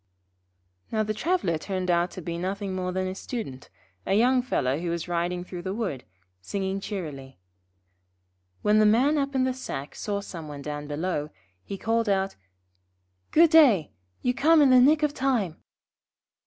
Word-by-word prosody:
Now 215 -1 +1
the 215 0 -2
traveller 215 - 0
turned 185 0 -2
out 175 +1 +2
to 185 - -6
be 170 +1 -4
nothing 195 +2 -3
more 180 -1 -2
than 185 +1 -1
a 185 - -3
Student, 190 - -6 0.3
a 195 - 0
young 250 +4 +4
fellow 140 - 0
who 175 0 -3
was 170 0 -3
riding 175 +1 -1
through 180 -1 -7
the 190 +2 -4
wood, 185 - -3 0.4
singing 195 - -3
cheerily. 150 -10 -6 1.3
When 210 +1 +4
the 215 - +5
Man 265 +8 +3
up 275 0 -2
in 260 - +3
the 260 0 +1
sack 145 - -6
saw 205 -2 -3
some 170 -5 -8
one 145 -1 -8
down 145 0 -5
below, 150 0 -2 0.3
he 195 - -6
called 225 +1 0
out: 195 0 0 0.9
'Good 330 0 +5
day. 255 - +6 0.3
You 250 - +2
come 310 +5 +4
in 270 - +5
the 255 -1 +7
nick 300 +4 +4
of 295 -1 +2
time.' 245 - 0
195 Hz, 170 wpm, -26 LUFS, 170-245 Hz, 1.3 s, the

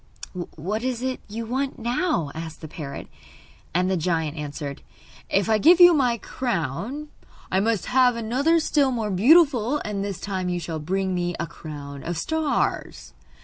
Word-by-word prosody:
'What 195 +8 -3
is 255 -1 -2
it 260 -1 -2
you 225 +2 -4
want 265 +4 -2
now?' 235 - 0
asked 160 0 -7
the 160 - -7
parrot; 145 -2 -7 0.6
and 180 +2 +1
the 190 - +1
giant 160 -3 -1
answered: 145 -2 -6 0.5
'If 200 +2 +2
I 220 -1 +3
give 340 - +6
you 350 -1 +9
my 250 -6 +2
crown 235 - -3 0.4
I 190 - +3
must 220 -1 +1
have 250 -1 +4
another 260 +9 +2
still 290 -3 +2
more 225 -4 -2
beautiful; 265 - +5
and 200 -2 -2
this 200 -3 -4
time 190 -3 -3
you 175 0 -1
shall 165 -2 -4
bring 190 +4 -1
me 175 -1 -1
a 170 - -1
crown 145 -4 -9
of 175 0 -3
stars. 315 - -1
205 Hz, 165 wpm, -24 LUFS, 165-255 Hz, 0.6 s, you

